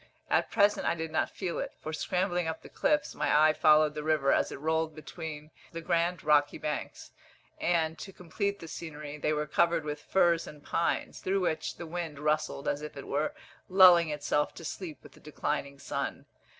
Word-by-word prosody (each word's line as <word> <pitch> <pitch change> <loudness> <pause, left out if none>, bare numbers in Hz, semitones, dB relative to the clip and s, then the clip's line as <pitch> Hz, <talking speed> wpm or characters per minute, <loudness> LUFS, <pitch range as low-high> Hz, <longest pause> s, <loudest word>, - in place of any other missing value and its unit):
At - - +2
present 205 -1 +3
I - - +2
did 160 -1 -4
not 160 - +1
feel 185 -3 -4
it, - - -4
for, 155 - -6
scrambling 180 0 0
up 160 0 -4
the - - -11
cliffs, 300 -1 +1
my 150 +1 +4
eye - - +2
followed 155 -1 +5
the 150 - -4
river 150 -3 +2
as - - +1
it - - -7
rolled 160 +1 0
between 155 -1 -8 0.2
the 165 - -4
grand 170 +1 0
rocky 145 -1 +3
banks; 150 - -5 0.5
and, 165 -2 +1
to 195 - -7
complete 200 +3 -3
the 165 - -10
scenery, 150 -2 -7
they 150 - 0
were 150 0 0
covered 170 +1 +2
with 150 0 -4
firs 170 -2 +2
and 150 -1 -11
pines, 170 - -1
through 195 +1 0
which 160 -3 -1
the 170 - -7
wind 165 -2 -5
rustled 150 -1 -1
as 145 - 0
if 150 -1 -8
it 140 - -7
were 150 +2 -1 0.3
lulling 180 -3 +7
itself 150 0 -1
to 165 - -9
sleep 165 -1 -6
with - - -14
the - - -18
declining 145 -1 -3
sun. 140 - -4
160 Hz, 195 wpm, -30 LUFS, 150-170 Hz, 0.5 s, lulling